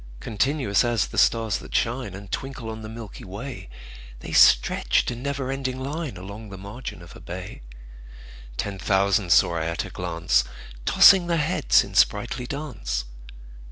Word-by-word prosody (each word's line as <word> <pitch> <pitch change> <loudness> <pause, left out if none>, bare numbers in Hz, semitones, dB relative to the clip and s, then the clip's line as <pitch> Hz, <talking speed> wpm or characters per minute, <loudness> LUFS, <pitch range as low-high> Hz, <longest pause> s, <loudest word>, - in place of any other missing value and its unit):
Continuous 115 - +1
as 120 -3 +1
the - - -9
stars 115 -3 +2
that - - -9
shine 115 -4 -1
And 100 0 -10
twinkle 135 -4 -5
on 110 0 -7
the 110 - -8
milky 110 -2 -9
way, 110 - -8 0.5
The - - -7
stretched - - +4
in 120 0 -7
never 135 -1 -3
ending 130 -1 -3
line 145 - -4
Along 100 +4 -9
the 100 - -9
margin 100 -2 -8
of 85 - -13
a - - -11
bay: 90 +1 -8 1.0
Ten 100 -2 -3
thousand 95 -2 +1
saw 85 0 +5
I 80 - -2
at 85 0 -2
a - - -9
glance, 85 -8 0 0.4
Tossing 190 -3 +7
their 170 -1 +1
heads 155 -2 +3
in - - -10
sprightly 125 - +1
dance. 60 - -4
110 Hz, 160 wpm, -24 LUFS, 95-135 Hz, 1.0 s, Tossing